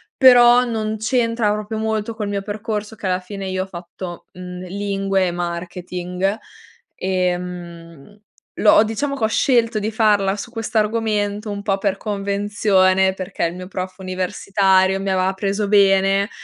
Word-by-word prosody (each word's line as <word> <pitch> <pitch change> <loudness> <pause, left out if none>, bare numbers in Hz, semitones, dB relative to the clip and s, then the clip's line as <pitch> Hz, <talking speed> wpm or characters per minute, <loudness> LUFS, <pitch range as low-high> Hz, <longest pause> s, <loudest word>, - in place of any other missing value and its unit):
però 245 -2 +7
non 220 -2 -2
c'entra 230 -1 +1
proprio 210 +1 -3
molto 220 0 -2
col 215 -2 -4
mio 200 -1 -3
percorso, 215 +1 -4
che 200 - -5
alla 185 0 +1
fine 195 +1 -7
io 185 0 -1
ho - - -7
fatto, 175 0 -9
mhmm, 180 0 -8
lingue 195 0 -1
e 175 - -1
marketing. 180 +2 -3 0.6
Ehm, 180 -1 -4 0.4
l'ho 210 0 +6
diciamo 275 +6 -2
che 240 - -5
ho - - +4
scelto 230 -2 +2
di 210 +1 -2
farla 205 -3 +2
su 235 +3 -7
questo 225 -1 -3
argomento 210 -1 0
un 200 0 -5
po' 195 -1 0
per 200 -1 0
convenzione, 200 -2 +1
perché 185 -2 -3
il 170 +1 -3
mio 180 0 -8
prof 185 0 -5
universitario 190 +1 +1
mi 195 0 -3
aveva 190 0 +1
preso 200 +1 -2
bene, 195 0 +4
200 Hz, 155 wpm, -20 LUFS, 185-215 Hz, 0.6 s, però